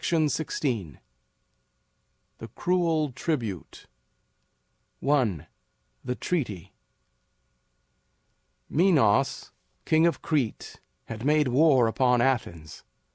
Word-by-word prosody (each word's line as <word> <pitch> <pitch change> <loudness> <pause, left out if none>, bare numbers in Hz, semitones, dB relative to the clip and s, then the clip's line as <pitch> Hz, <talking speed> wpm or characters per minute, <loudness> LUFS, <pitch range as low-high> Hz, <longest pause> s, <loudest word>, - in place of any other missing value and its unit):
THE 145 - -1 1.6
CRUEL 165 -5 0
TRIBUTE. 120 - -4 1.2
I. 120 - +1 0.6
THE 125 - -3
TREATY. 120 - -4 1.9
Minos, 140 - +2 0.3
king 160 +1 +3
of 170 - -2
Crete, 140 -8 -2 0.3
had 115 0 -8
made 150 -1 +2
war 135 -1 +4
upon 125 +2 +2
Athens. 110 - -2
135 Hz, 70 wpm, -26 LUFS, 115-155 Hz, 1.9 s, war